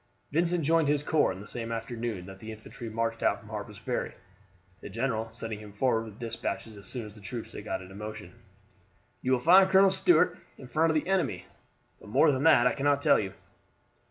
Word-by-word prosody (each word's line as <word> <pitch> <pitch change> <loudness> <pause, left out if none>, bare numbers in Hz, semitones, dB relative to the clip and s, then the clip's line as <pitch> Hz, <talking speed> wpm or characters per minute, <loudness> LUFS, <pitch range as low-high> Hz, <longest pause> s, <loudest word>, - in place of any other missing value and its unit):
Vincent 170 +2 +1
joined 165 0 +3
his 145 0 +1
corps 155 -6 +2
on 95 - -7
the 105 - -11
same 115 -1 -5
afternoon 115 -4 -4
that 95 0 -11
the 110 +2 -8
infantry 110 +1 -9
marched 115 +1 -2
out - - +2
from - - -15
Harper's - - -6
Ferry, - - -3 0.6
the - - -9
general 115 0 -2
sending 110 -2 -5
him 105 -1 -11
forward 115 +1 +1
with 110 -2 -11
despatches 115 -1 -4
as 100 -1 -11
soon 120 0 -5
as 105 - -10
the 105 - -14
troops 110 +4 -6
had 105 - -8
got 95 -3 -3
into 95 +1 -12
motion. 105 -3 -8 0.9
"You 130 - -1
will 130 - +3
find 185 +7 +6
Colonel 190 0 +6
Stuart 195 - +3 0.2
in 130 - -11
front 155 +6 +2
of 160 - +1
the 155 - 0
enemy; 145 - 0 0.5
but - - -13
more - - +5
than 130 -1 -1
that 150 -7 +6
I 125 - +4
cannot 145 0 +1
tell - - +5
you." 95 -3 -4
115 Hz, 215 wpm, -29 LUFS, 105-145 Hz, 0.9 s, find